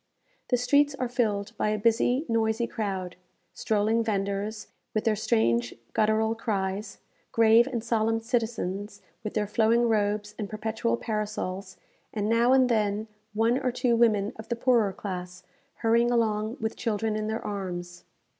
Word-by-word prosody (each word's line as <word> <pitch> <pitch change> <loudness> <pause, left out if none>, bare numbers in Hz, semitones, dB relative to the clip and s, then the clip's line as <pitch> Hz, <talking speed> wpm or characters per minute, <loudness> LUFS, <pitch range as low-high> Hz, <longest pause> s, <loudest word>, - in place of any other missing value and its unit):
The 250 - +3
streets 285 +3 +3
are 255 -2 -2
filled 220 -3 -1
by - - +1
a 215 - 0
busy, 235 +6 +2
noisy 225 0 +1
crowd: 190 -6 -4 0.4
strolling 220 +4 +1
vendors, 205 0 -2 0.3
with 215 - +1
their 220 -1 +2
strange 115 - +1 0.2
guttural 220 +1 +2
cries; 205 -2 -3 0.3
grave 230 +2 +5
and 240 -5 -3
solemn 225 -1 +1
citizens, 215 -4 -3 0.2
with 215 - -5
their 210 -1 +1
flowing 225 +3 +3
robes 210 -1 0
and 205 -2 -3
perpetual 220 +2 -1
parasols; 205 -4 -4 0.3
and, 210 -1 -2
now 230 +2 +3
and 260 -1 +5
then, 215 -2 0 0.3
one 230 +4 +2
or 255 -2 0
two 245 -1 +1
women 215 -3 +3
of 220 0 -10
the 235 - 0
poorer 235 -4 +3
class, 180 -2 -6 0.3
hurrying 235 +1 +2
along 220 -1 0
with 220 0 -2
children 220 -1 -1
in 215 0 -2
their 220 +1 -3
arms. 175 -3 -5
220 Hz, 150 wpm, -27 LUFS, 205-230 Hz, 0.4 s, grave